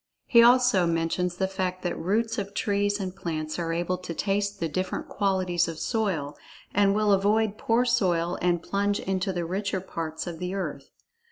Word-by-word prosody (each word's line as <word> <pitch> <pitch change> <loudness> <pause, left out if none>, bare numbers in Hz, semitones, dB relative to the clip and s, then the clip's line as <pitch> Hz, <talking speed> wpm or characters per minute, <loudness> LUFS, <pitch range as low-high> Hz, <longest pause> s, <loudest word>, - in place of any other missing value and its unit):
He 235 - +6
also 240 -6 +5
mentions 170 +2 -1
the 190 - +1
fact 185 -1 -3
that 175 - -1
roots 225 +6 0
of 200 0 -5
trees 205 0 0
and 190 -1 -4
plants 155 -2 -4
are 165 -1 -2
able 175 +2 -1
to 170 -2 -6
taste 200 +1 -1
the 165 - 0
different 185 +4 -3
qualities 185 -4 +1
of 165 -1 -5
soil, 185 -12 -1 0.4
and 200 0 +3
will 210 -1 +3
avoid 210 +2 +2
poor 230 +2 +2
soil 180 -8 +1
and 175 -1 +1
plunge 200 +1 0
into 190 +1 -1
the 175 -2 -2
richer 195 +2 -2
parts 165 -3 -5
of 170 -2 -6
the 180 +1 -3
earth. 155 -7 -4
190 Hz, 180 wpm, -26 LUFS, 175-205 Hz, 0.4 s, He